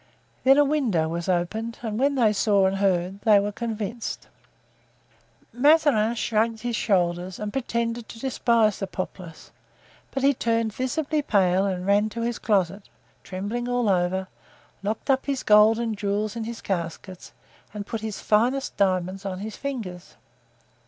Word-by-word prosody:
Then 270 +1 +6
a 290 - +6
window 245 - +1
was 170 +2 -4
opened 220 +6 -1
and 220 -1 -3
when 280 +2 +2
they 225 -5 +3
saw 200 -1 +3
and 190 +1 +1
heard 190 0 0
they 215 -2 +5
were 205 +1 -1
convinced. 225 +1 -5 1.3
Mazarin 255 -4 +4
shrugged 225 -1 0
his 240 0 -2
shoulders 180 -3 0
and 210 -1 -5
pretended 235 -3 -2
to 225 - -10
despise 230 -4 +2
the 195 - -3
populace; 185 -3 -7 0.6
but 270 - -3
he 280 +1 +5
turned 230 -3 0
visibly 295 +5 -1
pale 195 -6 +2
and 185 -2 -3
ran 205 +2 +3
to 230 +2 -5
his 235 0 -2
closet, 195 -2 0 0.3
trembling 210 +6 -4
all 245 -2 +1
over, 190 0 +1 0.5
locked 215 +7 -1
up 265 +1 0
his 275 -2 -1
gold 210 +1 +6
and 230 -2 -2
jewels 210 +1 -1
in 230 -1 -4
his 235 0 -6
caskets 180 0 -5 0.4
and 205 -1 -6
put 225 +1 -5
his 220 -2 -5
finest 245 +6 +1
diamonds 185 0 0
on 190 -2 -4
his 210 +3 -6
fingers. 215 -11 -6
215 Hz, 155 wpm, -25 LUFS, 190-235 Hz, 1.3 s, Then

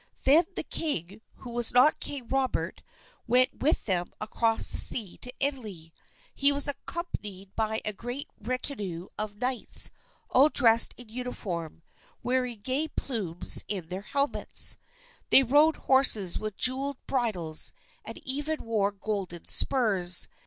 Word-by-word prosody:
Then 310 +6 +4
the - - -4
king 205 - -3
who 245 - -12
was 240 -1 +3
not 255 +5 +4
King 270 -5 -4
Robert 270 0 -3 0.5
went 250 +2 +1
with 305 +4 0
them 180 -4 -1
across 225 +1 +1
the - - +1
sea 215 -7 +4
to 250 - -5
Italy. 215 - -4 0.4
He 280 +1 +1
was 285 0 +4
accompanied 210 - -6
by 220 0 -2
a 210 - -2
great 245 +7 -8
retinue 210 -7 -6
of 210 -1 -4
knights, 250 +1 +2 0.4
all 275 +4 +5
dressed 230 -6 +5
in 245 -2 -14
uniform, 190 -10 -7 0.4
wearing 250 -3 -3
gay 265 +7 -2
plumes 210 - -1
in 185 -5 -4
their 185 +2 -6
helmets. 280 +6 +2 0.5
They 270 - +6
rode 295 +5 +3
horses 225 -9 +3
with 215 -2 -7
jeweled 270 +2 +2
bridles, 195 - +1 0.3
and - - -10
even 290 +4 -4
wore 210 -3 -1
golden 195 -4 -6
spurs. 195 -9 +3
235 Hz, 135 wpm, -26 LUFS, 200-270 Hz, 0.5 s, They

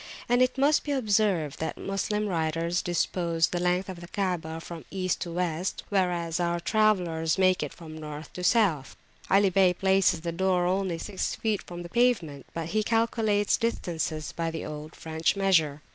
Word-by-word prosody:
And 245 +1 +3
it 255 +1 +2
must 285 +3 +3
be 290 - -2
observed 205 - +1
that 160 - -3
Moslem 210 +2 -2
writers 170 -1 0
dispose 170 -1 +1
the 175 - -2
length 180 +1 +1
of 185 -2 -7
the 175 - -9
Kaabah 175 -4 -2
from 165 -1 -8
East 185 -2 -2
to 170 - -4
West, 175 +1 -2
whereas 175 -4 0
our 170 0 0
travellers 175 -5 +1
make 185 -1 +3
it - - -3
from 160 -2 -11
North 150 0 -8
to 180 - -6
South. 180 - +2 0.3
Ali 195 0 +4
Bey 185 -1 +4
places 190 -3 +3
the 170 0 -3
door 180 +1 +1
only 185 -1 0
six 190 +3 -3
feet 215 -3 -1
from 175 0 -8
the - - -7
pavement, 185 - +1
but 165 -1 -4
he 215 +3 +1
calculates 220 -2 +1
distances 165 -9 -2
by 165 -1 -2
the 160 -1 -5
old 150 +1 -7
French 160 +2 -1
measure. 160 -7 +2
180 Hz, 175 wpm, -27 LUFS, 165-200 Hz, 0.3 s, Ali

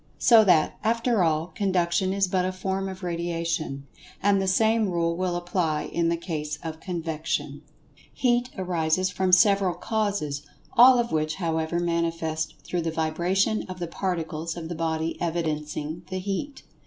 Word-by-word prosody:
So 230 -3 +7
that, 160 -5 +3
after 230 -1 +2
all, 160 +1 0
Conduction 185 -2 +1
is 195 0 +1
but 180 0 +1
a 185 - 0
form 190 +1 -3
of 190 0 -9
Radiation. 170 -4 -2 0.4
And 200 -1 +3
the 190 - -1
same 220 +2 +3
rule 170 -1 0
will 180 0 -1
apply 175 -3 -1
in 170 -1 +1
the 170 - 0
case 150 -3 -4
of 160 -1 -5
Convection. 165 -3 -3 0.5
Heat 245 -1 +1
arises 180 0 0
from 185 0 0
several 195 -1 +5
causes, 200 -10 -2 0.3
all 250 +2 +8
of 235 -1 0
which, 155 0 0
however, 165 -1 -1
manifest 165 -2 -1
through 175 +4 -2
the 165 - -1
vibration 175 +6 +1
of 185 - -6
the 175 - -3
Particles 165 -2 -3
of 165 -1 -6
the - - -3
body 160 0 -2
evidencing 155 -1 -2
the 185 - -3
Heat. 200 +10 -4
175 Hz, 155 wpm, -26 LUFS, 160-190 Hz, 0.5 s, all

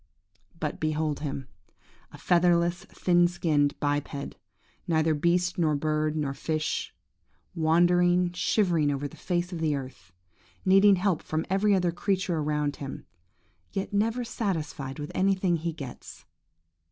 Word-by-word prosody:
But 150 - -3
behold 155 -1 -1
him–a 130 -10 -10
featherless, 175 0 +2
thin 175 -1 +2
skinned 150 -5 0
biped–neither 145 - -2
beast, 175 +4 +1
nor 155 -3 +2
bird, 155 +1 0
nor 145 -3 -1
fish; 155 +2 -2 0.6
wandering, 175 +2 +3
shivering 175 -4 +1
over 145 0 -2
the - - -14
face 175 0 -2
of 170 - -4
the 155 -2 +1
earth, 130 -9 -8 0.5
needing 195 +1 +6
help 185 -2 0
from 155 +1 -3
every 200 +1 +3
other 180 -2 +1
creature 185 -1 -1
around 150 -1 -1
him, 140 -1 -7 0.7
yet 195 +1 -3
never 225 +4 +1
satisfied 160 - -3
with 150 -1 -6
anything 190 -2 +2
he 165 +1 -3
gets! 140 -6 -10
165 Hz, 125 wpm, -27 LUFS, 145-180 Hz, 0.7 s, needing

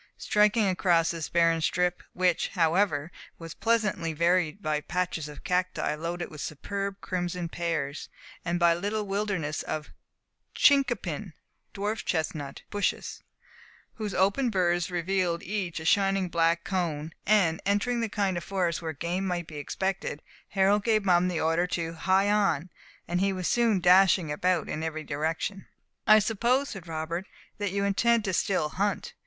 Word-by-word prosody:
Striking 210 +1 +3
across 175 -3 +2
this 165 -2 -4
barren 165 -1 +3
strip 180 +2 0
which, 180 -2 +1
however, 165 -2 +1 0.3
was 165 -1 -8
pleasantly 210 -8 0
varied 170 +2 +1
by 155 -6 -1
patches 170 -2 -2
of 150 - -11
cacti 180 -4 0
loaded 170 +3 -4
with 150 -2 -8
superb 200 +6 -4
crimson 180 -1 -3
pears, 165 -4 -3 0.3
and 170 +1 -1
by 170 -1 +5
little 205 +5 -2
wildernesses 195 -6 -2
of 150 -1 -5 0.6
chincopin 225 - +2 0.4
(dwarf 210 +2 -3
chestnut) 155 -4 -3
bushes, 205 -1 -2 0.7
whose 210 -3 -4
open 200 +7 +2
burrs 175 -4 +1
revealed 175 -1 -1
each 185 -4 -3
a 160 - -8
shining 195 0 +3
jet 175 - -8
black 165 0 +2
cone 165 -5 -2
and 190 -6 +3
entering 205 +5 +1
the 225 -1 -1
kind 195 -3 0
of 170 - -4
forest 180 -3 -1
where 160 -1 -4
game 175 +6 -2
might 175 -2 -2
be 155 -1 -10
expected, 190 +1 -3 0.3
Harold 200 +1 +3
gave 215 -3 +2
Mum 180 -1 +4
the 175 -3 -1
order 165 +3 +1
to 165 -2 -3
"Hie 190 +4 +2
on"; 195 -5 +1 0.4
and 175 +1 0
he 195 0 +2
was 185 -2 -3
soon 230 -5 +3
dashing 180 -2 +5
about 180 +2 0
in 155 - -4
every 160 -1 -3
direction. 160 +7 -3 0.4
"I 215 - +9
suppose," 235 +6 +1
said 190 -5 -8
Robert, 165 +3 -4 0.3
"that 205 -2 -1
you 200 +1 -1
intend 225 +3 +2
to 190 - -1
still 180 -4 +1
hunt. 200 +5 -2
180 Hz, 155 wpm, -28 LUFS, 165-200 Hz, 0.7 s, I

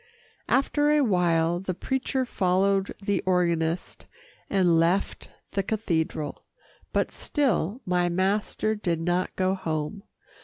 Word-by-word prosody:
After 290 +2 +2
a 300 0 +4
while 175 -5 +2
the 185 -1 -4
preacher 265 +5 -1
followed 195 -1 +1
the 200 -2 0
organist, 170 -2 0 0.4
and 180 -4 +3
left 175 +4 0 0.2
the 200 - 0
cathedral, 165 -8 -2 0.5
but - - 0
still 250 - -1
my 180 -1 +1
master 200 +4 0
did 175 -6 -1
not 175 +2 -1
go 185 0 +1
home. 160 +1 -3
185 Hz, 115 wpm, -26 LUFS, 170-205 Hz, 0.5 s, a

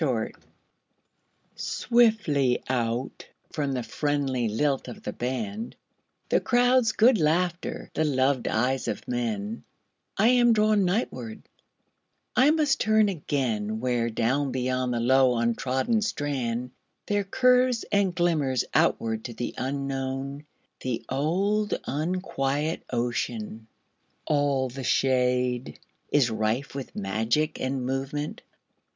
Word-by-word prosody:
Seaside 125 -8 0 1.2
SWIFTLY 215 - +2
out 120 0 -2 0.2
from 145 -3 -2
the 125 -2 -2
friendly 135 -4 -1
lilt 135 +6 0
of 120 - -9
the - - -4
band, 200 - -4 0.5
The - - +4
crowd's 245 -1 +3
good 230 0 +5
laughter, 170 +3 0
the 160 - +1
loved 135 -3 +1
eyes 130 +4 0
of - - -4
men,I 110 - -3
am 240 -1 +5
drawn 215 -2 +3
nightward; 155 - -2 0.9
I 260 +3 +5
must 300 -3 +2
turn 215 -1 +3
againWhere, 120 - -1
down 135 +4 +1
beyond 130 0 -1
the 120 - -1
low 130 +1 +4
untrodden 130 - 0
strand, 125 - -2 0.3
There 205 -1 0
curves 250 +2 +3
and 200 -3 +2
glimmers 155 -8 +1
outward 110 -1 +1
to 120 - -6
the 120 - -4
unknownThe 135 -1 -4
old 195 +10 0
unquiet 155 -1 -1
ocean. 115 -2 -3 0.6
All 145 -3 +1
the 130 +2 -7
shadeIs 125 0 0
rife 110 +5 -1
with 135 -1 -7
magic 110 +10 0
and 130 -1 -2
movement. 135 +3 -3
135 Hz, 105 wpm, -26 LUFS, 125-180 Hz, 1.2 s, good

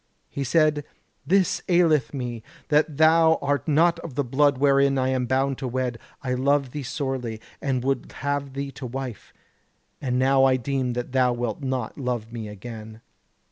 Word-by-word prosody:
He 140 - -3
said: 150 +1 +2 0.4
'This 190 0 +2
aileth 160 -9 +3
me, 120 -4 -4 0.3
that 150 +1 +4
though 160 +1 +5
thou - - -18
art 140 -2 -1
not 165 +3 +3
of 165 -6 -8
the 145 - +1
blood 140 +2 +2
wherein 140 0 +3
I 130 0 +1
am 130 -1 0
bound 135 +1 0
to 135 - -3
wed, 125 -1 -2 0.2
I 130 -1 -1
love 135 +1 +1
thee 150 - -5
sorely, 130 -4 -3 0.2
and 130 -3 -1
would 135 +1 -1
have 140 -1 -3
thee 140 0 -4
to 130 - -7
wife; 130 -3 -6 0.7
and 125 -2 -1
now 135 +1 +4
I 135 -1 +5
deem 130 -1 -1
that 125 +1 -4
thou 125 -1 +3
wilt 120 -3 -3
not 130 -2 -3
love 120 -3 -3
me 115 -2 -5
again.' 110 +1 -9
135 Hz, 180 wpm, -24 LUFS, 125-145 Hz, 0.7 s, though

